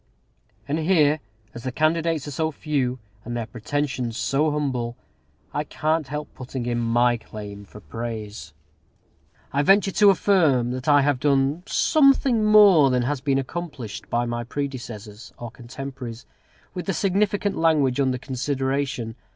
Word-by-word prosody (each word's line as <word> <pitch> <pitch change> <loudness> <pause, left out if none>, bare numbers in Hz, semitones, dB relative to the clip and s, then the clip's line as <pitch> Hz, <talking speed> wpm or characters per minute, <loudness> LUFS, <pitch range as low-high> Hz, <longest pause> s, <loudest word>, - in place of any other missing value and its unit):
And 150 +3 -1
here, 155 -3 +3 0.3
as 120 - -8
the 130 - -3
candidates 160 +1 0
are - - -5
so 160 +3 -1
few, 140 -5 -1 0.3
and 120 +1 -4
their 115 - -3
pretensions 125 0 -3
so 150 +3 +1
humble, 130 -5 -2 0.6
I 150 - -1
can't 155 0 -1
help 150 +2 -6
putting 130 -1 -6
in 120 -1 -1
my 120 +1 +2
claim 105 -2 -9
for 105 - -13
praise. 110 -8 -6 1.0
I 140 - +2
venture 195 +5 +4
to 205 +2 +5
affirm 160 -11 +3
that 130 +2 -5
I 145 -1 +5
have 145 -2 +1
done 140 +3 +1
something 275 -6 +3
more 205 -9 +7
than 125 -1 +1
has 135 +1 -2
been 135 -1 +1
accomplished 135 -6 -5
by 120 +1 0
my 120 0 -3
predecessors, 120 -5 -6
or 120 -2 -7
contemporaries, 125 0 -8 0.5
with 180 0 -6
the 195 - 0
significant 200 +2 +1
language 150 -6 +2
under 130 -2 +1
consideration. 130 -2 -2
135 Hz, 145 wpm, -24 LUFS, 120-155 Hz, 1.0 s, more